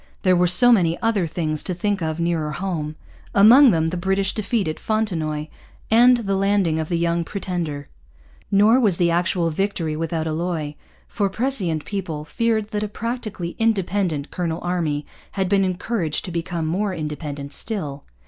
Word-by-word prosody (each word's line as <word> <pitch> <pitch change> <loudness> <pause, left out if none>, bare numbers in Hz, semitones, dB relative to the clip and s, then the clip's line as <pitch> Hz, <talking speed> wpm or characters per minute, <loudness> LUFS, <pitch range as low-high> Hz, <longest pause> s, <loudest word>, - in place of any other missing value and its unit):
There 185 -1 +4
were 180 0 +3
so 245 +8 +5
many 170 -7 +3
other 215 -6 +1
things 155 -2 -2
to 180 - -3
think 200 +2 -1
of 160 0 -2
nearer 165 -3 -1
home; 155 -4 -3 0.4
among 240 +7 +8
them 160 -5 +2
the 180 - -3
British 190 +2 0
defeat 215 -1 -1
at 155 - -3
Fontenoy 165 -9 -1 0.5
and 245 +2 +6
the 200 -4 -1
landing 195 -5 +1
of 155 - -3
the 170 - 0
Young 170 0 +1
Pretender. 170 -7 -4 0.6
Nor 210 +5 +5
was 205 -9 +2
the 170 -1 +2
actual 170 0 +1
victory 165 -3 -1
without 160 0 -2
alloy; 160 -2 -2 0.3
for 200 -3 -1
prescient 195 - -2
people 170 -7 -4
feared 220 +4 -1
that 210 -2 -1
a 210 - -1
practically 215 -5 -5
independent 195 -8 0
colonial 170 -2 -2
army 165 -5 -1 0.3
had 190 -2 0
been 195 +1 +3
encouraged 180 -2 -2
to 180 - -6
become 170 -1 -3
more 190 +4 -1
independent 150 -2 -5
still. 145 -7 -3
180 Hz, 165 wpm, -22 LUFS, 160-205 Hz, 0.6 s, among